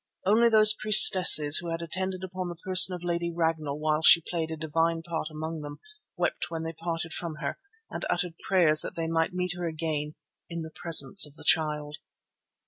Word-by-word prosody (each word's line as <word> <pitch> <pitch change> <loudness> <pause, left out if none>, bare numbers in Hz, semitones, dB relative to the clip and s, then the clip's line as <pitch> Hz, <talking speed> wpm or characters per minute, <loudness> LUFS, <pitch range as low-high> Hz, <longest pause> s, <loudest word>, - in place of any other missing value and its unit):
Only 225 +4 +1
those 215 -1 +5
priestesses 185 -8 +7
who 170 - -5
had 165 0 -7
attended 185 +3 -6
upon 185 0 -8
the 175 - -9
person 185 +1 +5
of 175 - -13
Lady 170 0 -5
Ragnall 160 -4 -4
while 155 0 -3
she 165 - +6
played 165 -2 -6
a 160 - -8
divine 165 +1 -4
part 165 -2 -7
among 160 +1 -9
them 145 0 -11 0.4
wept 175 - -5
when 165 -1 -8
they 165 0 -8
parted 165 0 -7
from 170 -3 -7
her, 150 -2 -8 0.3
and - - -8
uttered 175 -1 -4
prayers 170 -5 0
that - - -9
they 165 - -6
might 165 0 -3
meet 180 -1 -4
her 175 -1 -7
again 155 -2 -6 0.3
"in 170 -1 -7
the 160 - -12
presence 165 0 +3
of 145 - -19
the - - -11
Child." 150 -2 -2
165 Hz, 195 wpm, -24 LUFS, 155-175 Hz, 0.4 s, priestesses